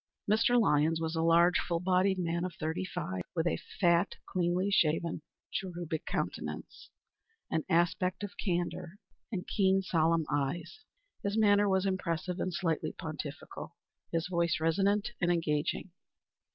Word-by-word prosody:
Mr. 230 +4 +4
Lyons 160 -5 +3
was 160 0 -2
a 160 - +1
large, 170 +2 +5
full 170 -1 -1
bodied 185 +2 +2
man 170 -1 -1
of 180 -1 -4
thirty 160 +3 -2
five, 95 - -4
with 165 -1 +1
a 170 - +1 0.2
fat, 175 0 +3
cleanly 180 +2 0
shaven, 165 -2 +2 0.3
cherubic 175 -4 -4
countenance, - - -4 0.6
an 160 -1 +1
aspect 180 +3 +1
of 205 - -5
candor, 175 0 -2 0.3
and 185 -5 -3
keen, 195 -1 +2
solemn 165 -2 +2
eyes. 150 - -2 0.4
His 200 +2 -1
manner 205 -1 +5
was 190 0 +2
impressive 180 -1 -1
and 185 - -1
slightly 165 -3 -1
pontificial; 150 -2 -7 0.4
his 165 +1 0
voice 170 -2 +1
resonant 195 +6 +2
and 175 0 +3
engaging. 160 +2 -1
175 Hz, 140 wpm, -31 LUFS, 165-190 Hz, 0.6 s, large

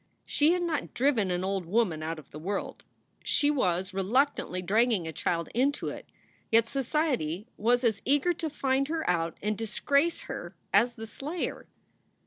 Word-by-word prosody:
She 305 +3 +3
had 355 -1 0
not 330 -3 -2
driven 240 -7 +2
an 180 0 -1
old 190 -1 -1
woman 185 -5 +1
out 160 +1 -3
of 155 - -13
the 150 - -8
world, 195 +5 -4 0.4
she 290 0 +3
was 190 -8 0
reluctantly 195 0 +1
dragging 215 -1 +2
a - - -3
child 170 +2 -1
into 275 +5 +1
it, - - -8 0.4
yet 230 0 +5
society 260 - -1
was 245 +3 +2
as 220 -4 +1
eager 290 +6 +3
to 325 -1 -3
find 275 -2 0
her 320 +1 -2
out 165 -2 0
and 210 +1 0
disgrace 280 +9 +1
her 175 +1 -7 0.2
as 235 +5 +4
the 225 - -7
slayer. 300 +9 -4
230 Hz, 165 wpm, -29 LUFS, 185-280 Hz, 0.4 s, yet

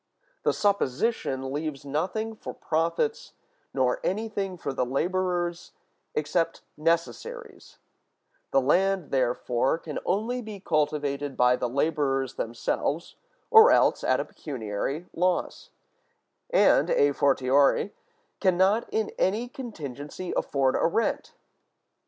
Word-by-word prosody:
The - - +2
supposition 140 - 0
leaves 150 -2 -4
nothing 185 +10 -2
for - - -8
profits, 170 - -1 0.4
nor 130 -2 +1
anything 200 -2 -2
for 140 - -4
the 130 - 0
laborers 175 +5 -1 0.4
except 165 +3 -1
necessaries: 170 - -3 0.7
the 135 - +4
land, 185 +5 +2
therefore, 125 +1 +1
can 155 -3 -6
only 235 +5 -1
be 215 -3 -8
cultivated 145 -5 -1
by 125 0 +5
the 125 - -2
laborers 135 -1 0
themselves, 140 +7 -2 0.4
or 445 +1 +9
else - - +3
at - - +2
a - - -2
pecuniary 135 - -4
loss; 185 - -1 0.8
and, - - +4
a 475 -4 +4
fortiori, 140 +6 +3 0.5
can 185 -3 +2
not 195 +5 +3
in 220 -1 -1
any 215 +6 +1
contingency 170 - -7
afford 135 -2 +1
a - - +3
rent. 225 +7 -1
165 Hz, 110 wpm, -27 LUFS, 140-200 Hz, 0.8 s, or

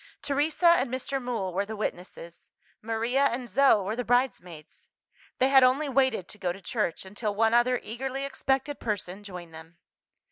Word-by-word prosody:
Teresa 295 +4 0
and 255 - -1
Mr. 265 +2 -3
Mool 230 -7 -3
were 195 +3 0
the 220 +2 -7
witnesses; 175 -4 -6 0.3
Maria 230 +5 0
and 245 -1 -1
Zo 265 -6 +4
were 210 +4 -3
the 245 - -2
bridesmaids: 205 - -2 0.5
they 260 - +3
had 270 -1 +7
only 265 +4 +3
waited 260 -8 +1
to 210 - -9
go 180 -2 -1
to 185 - -8
church, 195 -3 -2
until 205 +2 -4
one 225 +2 +2
other 245 +1 +3
eagerly 265 +4 -4
expected 270 +1 -1
person 205 -2 -4
joined 180 -4 -9
them. 160 +1 -12
230 Hz, 170 wpm, -27 LUFS, 195-265 Hz, 0.5 s, had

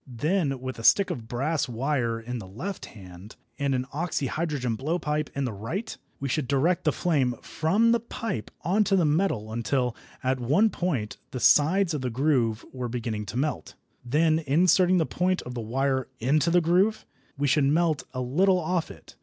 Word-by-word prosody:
Then 140 +3 -1
with 130 -2 -5
a - - -7
stick 195 - +5
of 115 -10 -6
brass 140 +5 -1
wire 120 -1 -1
in 120 +1 -5
the 95 - -9
left 170 - -6
hand, 95 0 -12 0.2
and 140 -1 +1
an 125 0 -1
oxyhydrogen 150 -5 -2
blowpipe 150 +2 -2
in 140 -1 -1
the 120 - -3
right, 160 - -5 0.2
we 140 - -3
should 135 +1 -1
direct 145 +8 +1
the 155 - +4
flame 135 -7 +1
from 200 +9 +2
the 235 - +3
pipe 225 - -5
on 195 +6 +3
to 195 - +2
the 180 -4 +3
metal 145 - 0
until, 120 +1 0 0.3
at 130 0 0
one 155 - +3
point, 135 -13 -2
the 130 - -5
sides 165 - +4
of 150 - -2
the 130 - -1
groove 125 -3 +1
were 125 -2 -4
beginning 110 -3 -4
to 105 - -5
melt. 145 -2 -2 0.3
Then, 155 +5 +2
inserting 180 +5 +3
the 165 - +2
point 185 +3 0
of 125 - -7
the 120 - -4
wire 130 +3 -1
into 150 +7 +2
the 175 +1 +4
groove, 185 +6 +2 0.3
we 145 - 0
should 140 +1 +3
melt 155 -1 +2
a 130 -1 -4
little 180 +10 +3
off 175 0 -1
it. - - -14
140 Hz, 185 wpm, -26 LUFS, 125-170 Hz, 0.3 s, stick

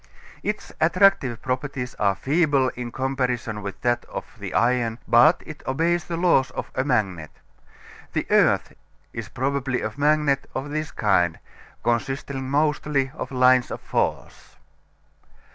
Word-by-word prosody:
Its 210 0 -4
attractive 160 - +3
properties 130 -1 -3
are 100 -2 +2
feeble 140 - +2
in 120 -1 -6
comparison 125 -4 -2
with 100 -1 -6
that 120 0 +1
of - - -6
the - - -6
iron, 120 -1 +1
but 135 +8 +5
it 155 - -9
obeys 170 +6 +1
the 170 - -4
laws 170 -7 +3
of - - -4
a 130 - 0
magnet. 100 - -1 0.8
The - - -1
earth - - +3 0.4
is 115 -3 -6
probably 135 0 -1
a 110 - -3
magnet 145 -1 +2
of 135 +2 -4
this 155 0 -2
kind, 95 - +1 0.5
consisting 135 +2 -2
mostly 145 -2 +1
of 155 - -6
lines 130 -1 +4
of - - -5
force. - - -3
130 Hz, 135 wpm, -24 LUFS, 120-145 Hz, 0.8 s, but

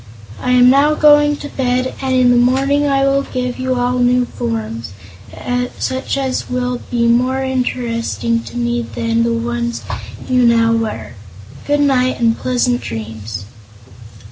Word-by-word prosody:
I 250 - 0
am 250 0 +6
now 290 +3 +4
going 295 -1 +5
to 290 - -7
bed, 255 -1 -1
and 260 -1 0
in 250 -1 +4
the - - +4
morning 270 +4 +2
I 275 -1 +2
will 275 0 +2
give 250 -2 -4
you 255 0 -1
all 250 0 0
new 245 0 +3
forms, 115 - -5 0.8
such 260 +1 -2
as 265 -2 -2
will 250 0 -2
be 235 -1 0
more 255 +3 +2
interesting 235 -3 -1
to - - -8
me 240 0 0
than 230 0 -2
the 235 0 +1
ones 235 0 -2 0.4
you 255 -1 +2
now 230 -1 +4
wear. 120 - -3 0.5
Good 290 0 +2
night, 260 -3 +2
and 230 -1 +2
pleasant 245 0 0
dreams." 110 -2 -6
245 Hz, 150 wpm, -17 LUFS, 230-260 Hz, 0.8 s, am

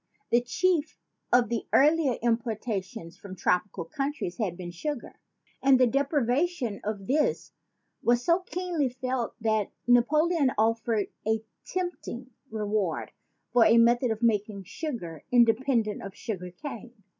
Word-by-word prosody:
The 235 - +5
chief 315 +6 0 0.3
of 245 -2 +4
the 235 -2 -2
earlier 295 -2 +4
importations 225 -5 -2
from 195 -2 -9
tropical 180 0 0
countries 275 - -3
had 185 -6 -1
been 175 -2 -6
sugar; 270 - -5 0.4
and 265 -1 +5
the 255 - +6
deprivation 275 - 0
of 205 -2 -4
this 295 +6 0 0.5
was 240 +1 +2
so 340 +1 +4
keenly 355 -6 -2
felt 255 -1 -3
that 220 -2 +1 0.2
Napoleon 285 +4 +3
offered 225 -1 +1 0.2
a 220 0 +1 0.2
tempting 350 -9 -4 0.2
reward 210 -5 -2 0.4
for 245 -2 +6
a 230 +1 +6
method 240 +2 +4
of 220 +1 -3
making 210 -3 +1
sugar 185 - -6
inde 235 -2 +6
pendent 225 -6 +1
of 195 0 -8
sugar 185 -6 -5
cane. 240 - -8
235 Hz, 135 wpm, -28 LUFS, 210-275 Hz, 0.5 s, the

